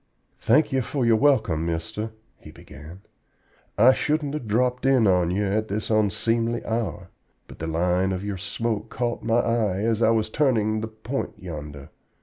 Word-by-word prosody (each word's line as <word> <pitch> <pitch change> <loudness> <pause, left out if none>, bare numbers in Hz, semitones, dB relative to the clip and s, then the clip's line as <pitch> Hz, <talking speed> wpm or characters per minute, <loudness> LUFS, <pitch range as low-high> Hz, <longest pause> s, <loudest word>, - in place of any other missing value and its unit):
"Thank 145 +7 +3
ye 135 -1 +1
for 130 +1 -2
your 115 -1 +4
welcome, 110 - +2
mister," 85 +6 -3 0.3
he - - -13
began. 80 +1 -13 0.8
"I 130 +2 +7
shouldn't 150 0 -1
have 150 -7 -5
dropped 125 +4 0
in 130 -4 +4
on 90 -3 +3
ye 95 +4 0
at 105 +2 0
this 105 +2 -3
onseemly 115 +3 +1
hour, 115 -2 -3 0.4
but - - -13
the 80 - -4
line 90 +3 +1
of 95 +1 -3
your 100 -2 -3
smoke 110 +4 -3
caught 120 -1 -2
my 115 0 +1
eye 115 -5 +1
as 115 0 0
I 115 - +4
was 110 -1 +1
turning 110 -7 +1
the 110 - -3
point 110 +5 -5
yonder. 75 -5 -8
110 Hz, 170 wpm, -24 LUFS, 90-120 Hz, 0.8 s, I